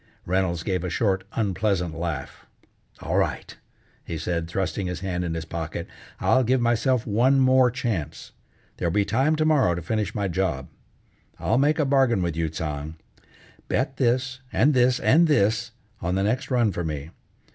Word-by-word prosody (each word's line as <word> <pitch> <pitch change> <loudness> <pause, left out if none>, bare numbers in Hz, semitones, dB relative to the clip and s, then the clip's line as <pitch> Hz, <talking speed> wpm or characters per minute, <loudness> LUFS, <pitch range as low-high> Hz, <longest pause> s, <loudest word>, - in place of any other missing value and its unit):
Reynolds 90 -2 0
gave 95 -2 -1
a 90 - -2
short, 95 0 0
unpleasant 100 -5 0
laugh. 80 -4 -5 0.5
"All - - -1
right," - - -1 0.5
he 85 - -5
said, 85 +1 -2
thrusting 95 +2 -2
his 90 0 -4
hand 90 -2 -2
in 85 -2 -3
his 80 -1 -4
pocket. 80 -1 -5 0.3
"I'll 130 - +3
give 130 +2 +2
myself 120 +1 +1
one 125 +6 +3
more 130 -1 +5
chance. 115 - -4 0.5
There'll 85 - -1
be 100 +2 +2
time 145 +8 +2
to 155 0 +1
morrow 140 - +3
to 85 - -4
finish 105 +3 -2
my 100 -2 0
job. 85 -8 -2 0.7
I'll - - +1
make 145 +3 +3
a 150 - +2
bargain 135 -7 +3
with 85 -3 -2
you, 80 -1 -1
Tsang! 75 -1 -5 0.7
Bet 135 - -1
this, 130 +1 0
and 150 +3 +3
this, 125 -1 +3
and 165 +4 +4
this, 115 -4 +2 0.3
on 90 +2 -1
the 95 - +1
next 120 +6 -1
run 120 -5 +2
for 90 - -3
me. 75 -1 -5
100 Hz, 170 wpm, -25 LUFS, 85-125 Hz, 0.7 s, more